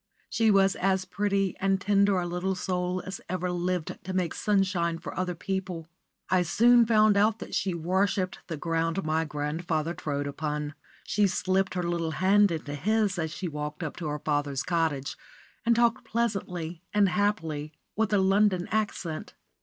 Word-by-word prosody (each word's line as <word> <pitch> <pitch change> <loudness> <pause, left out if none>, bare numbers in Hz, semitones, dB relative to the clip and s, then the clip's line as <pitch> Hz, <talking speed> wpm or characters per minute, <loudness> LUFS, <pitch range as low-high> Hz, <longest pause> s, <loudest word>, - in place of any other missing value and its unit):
She 225 -1 +3
was 195 -2 +4
as 190 0 +1
pretty 195 0 0
and 195 0 +2
tender 200 0 +3
a 175 - -2
little 180 +2 -1
soul 180 0 -2
as 190 0 -6
ever 180 0 -1
lived 180 -1 -2
to 185 - -5
make 180 -3 0
sunshine 185 -5 +1
for - - -8
other 180 -1 -2
people. 185 -2 -4 0.4
I 185 -1 +3
soon 235 +7 +5
found 215 -2 +5
that 215 +3 +1
she 185 -3 0
worshipped 185 +2 0
the 165 -3 -4
ground 165 +3 -1
my 160 +1 +1
grandfather 155 +2 -2
trod 145 -4 -3
upon. 150 +1 -3 0.3
She 210 -1 +2
slipped 190 0 0
her 180 - -1
little 170 -1 -1
hand 200 +2 +5
into 155 -4 -4
his 205 +4 +1
as 160 -1 -1
she 180 +3 -4
walked 150 0 -5
up 150 - -4
to 165 - -4
her 150 0 -2
father's 145 -2 -1
cottage, 160 -6 -1 0.5
and 235 - +5
talked 235 0 +2
pleasantly 180 -7 -2
and 205 -1 +4
happily 165 -7 -1 0.2
with 220 +1 +1
a 205 - +4
London 190 -1 +3
accent. 200 -7 -2
180 Hz, 165 wpm, -28 LUFS, 165-200 Hz, 0.5 s, soon